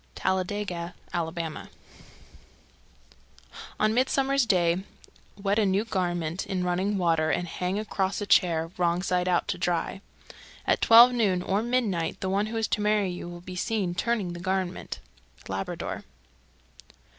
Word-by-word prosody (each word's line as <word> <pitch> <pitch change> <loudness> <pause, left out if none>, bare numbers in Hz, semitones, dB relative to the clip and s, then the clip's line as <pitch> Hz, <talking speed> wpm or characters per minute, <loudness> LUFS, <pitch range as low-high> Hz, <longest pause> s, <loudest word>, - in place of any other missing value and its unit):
Talladega, 185 -2 -2 0.2
Ala. 165 -2 -1
325. 165 -2 -5 2.1
On 215 0 +3
Midsummer's 265 +1 +2
Day 175 -3 +3 0.6
wet 200 +1 +1
a 215 - +3
new 195 +3 +1
garment 175 -4 -1
in 185 -2 -1
running 185 +3 0
water 165 -3 +2
and 175 +4 0
hang 180 +3 -2
across 200 -2 -1
a 205 - -3
chair, 165 -4 +3
wrong 175 0 +1
side 180 -1 0
out, 175 -1 +1
to 180 - -2
dry. 180 +2 -1 0.6
At - - +2
twelve 235 +2 +9
noon 200 -7 +1
or 195 +3 +1
midnight 225 -8 0
the 190 - -2
one 200 +2 +1
who 225 +1 -4
is 225 - 0
to 210 - 0
marry 210 -2 +2
you 175 -1 -6
will 175 0 -9
be 180 +1 -8
seen 195 -2 -1
turning 200 -1 -1
the 175 - -7
garment. 185 0 -2 0.5
_Labrador. 95 0 -4
185 Hz, 145 wpm, -27 LUFS, 175-210 Hz, 2.1 s, twelve